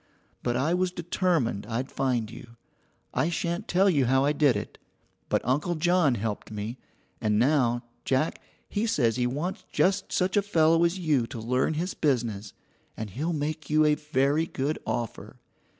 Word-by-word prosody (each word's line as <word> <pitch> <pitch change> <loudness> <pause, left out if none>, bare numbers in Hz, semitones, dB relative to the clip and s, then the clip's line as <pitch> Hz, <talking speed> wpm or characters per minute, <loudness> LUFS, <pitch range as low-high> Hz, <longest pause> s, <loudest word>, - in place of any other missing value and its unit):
But 120 -1 -1
I 150 +6 +1
was 180 0 +1
determined 170 - 0
I'd 125 +4 -3
find 120 -5 -1
you. 120 -1 -12 0.6
I 160 - +1
shan't 170 0 -2
tell 190 +3 +3
you 145 -9 +3
how 135 +2 +3
I 145 - +2
did 145 -5 +3
it, 105 - -5 0.5
but - - +1
Uncle 150 +8 +1
John 170 -4 +3
helped 105 -1 -4
me, 110 +3 -5 0.4
and 105 -1 +2
now, 120 -1 +2 0.2
Jack, 135 +4 0 0.3
he 215 +3 -1
says 120 - +2
he 125 -1 +1
wants 150 +9 -3
just 190 +1 +1
such 185 0 +1
a 205 - +5
fellow 165 -4 +3
as 170 +2 0
you 150 -9 +1
to 115 - -7
learn 125 +7 0
his 175 +4 -2
business, 115 -8 -1 0.4
and 110 -2 -5
he'll 150 - -2
make 155 -1 -3
you 155 0 +4
a 150 - +5
very 150 +1 +1
good 145 +1 -2
offer. 120 -3 -4
145 Hz, 170 wpm, -27 LUFS, 120-170 Hz, 0.6 s, a